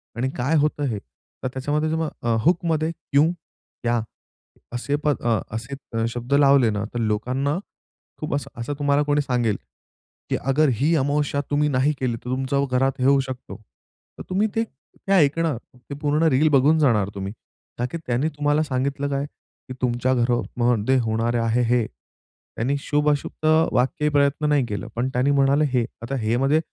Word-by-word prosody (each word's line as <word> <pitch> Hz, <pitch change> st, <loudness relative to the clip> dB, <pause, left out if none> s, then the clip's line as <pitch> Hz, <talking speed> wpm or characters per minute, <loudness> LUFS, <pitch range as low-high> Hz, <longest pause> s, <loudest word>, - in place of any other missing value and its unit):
आणि 125 Hz, +3 st, -1 dB
काय 135 Hz, +6 st, +1 dB
होतं 150 Hz, 0 st, +1 dB
हे? 110 Hz, -5 st, -2 dB, 0.4 s
तर -, -, 0 dB
त्याच्यामध्ये 145 Hz, +4 st, -1 dB, 0.5 s
हूकमध्ये 165 Hz, -1 st, +1 dB
क्यु, 145 Hz, -3 st, +1 dB, 0.6 s
क्या 120 Hz, -1 st, +1 dB, 0.7 s
असे 125 Hz, +4 st, -1 dB
प -, -, +4 dB
अ, 120 Hz, -5 st, +1 dB, 0.2 s
असे 115 Hz, -1 st, -4 dB
शब्द 120 Hz, +3 st, -4 dB
लावले 140 Hz, -4 st, +5 dB
ना, 105 Hz, -1 st, -2 dB
तर 120 Hz, -, -2 dB
लोकांना 125 Hz, +7 st, 0 dB, 0.6 s
खूप 155 Hz, -, -3 dB
असं 140 Hz, -4 st, -6 dB
असं 125 Hz, +5 st, -3 dB
तुम्हाला 145 Hz, 0 st, +2 dB
कोणी 145 Hz, 0 st, +2 dB
सांगेल, 125 Hz, -6 st, 0 dB, 0.7 s
की -, -, +1 dB
अगर 140 Hz, +3 st, +2 dB
ही 150 Hz, +9 st, +2 dB
अमावस्या 145 Hz, 0 st, 0 dB
तुम्ही 150 Hz, +1 st, +2 dB
नाही 135 Hz, +2 st, +2 dB
केली, 125 Hz, -3 st, 0 dB
तर 120 Hz, +2 st, -9 dB
तुमचं 135 Hz, +2 st, 0 dB
घरात 135 Hz, +1 st, +1 dB
हे 125 Hz, -, +1 dB
होऊ 140 Hz, +1 st, +5 dB
शकतो, 130 Hz, -1 st, -7 dB, 0.6 s
तर -, -, -7 dB
तुम्ही 195 Hz, +4 st, +2 dB
ते 225 Hz, -, +2 dB
ते 195 Hz, -, -11 dB
ऐकणार, 160 Hz, -4 st, +3 dB, 0.2 s
ते 125 Hz, +3 st, -9 dB
पूर्ण 150 Hz, +2 st, +1 dB
रील 150 Hz, +3 st, +3 dB
बघून 145 Hz, +3 st, +4 dB
जाणार 110 Hz, -9 st, +3 dB
तुम्ही, 100 Hz, 0 st, -4 dB, 0.5 s
ताकी 125 Hz, +6 st, -2 dB
त्यांनी 125 Hz, +5 st, +1 dB
तुम्हाला 145 Hz, +1 st, +2 dB
सांगितलं 140 Hz, 0 st, -1 dB
काय? 140 Hz, 0 st, -1 dB, 0.4 s
की -, -, -4 dB
तुमच्या 125 Hz, +1 st, +1 dB
घरमध्ये 120 Hz, 0 st, +1 dB
होणारे 115 Hz, +1 st, 0 dB
आहे 115 Hz, +1 st, +1 dB
हे, 120 Hz, -1 st, +2 dB
त्यांनी 130 Hz, +5 st, -7 dB
शुभ-अशुभचं 150 Hz, +2 st, +1 dB
वाक्य 135 Hz, +4 st, +1 dB
प्रयत्न 145 Hz, +1 st, +2 dB
नाही 145 Hz, -3 st, +3 dB
केलं, 105 Hz, -2 st, -4 dB
पण 120 Hz, +3 st, 0 dB
त्यांनी 130 Hz, +3 st, +2 dB
म्हणाले 140 Hz, +2 st, +3 dB
हे. 120 Hz, -2 st, +2 dB, 0.2 s
आता 135 Hz, +4 st, -3 dB
हे 110 Hz, +2 st, +1 dB
मध्ये 135 Hz, +4 st, +3 dB
135 Hz, 160 wpm, -23 LUFS, 120-145 Hz, 0.7 s, लावले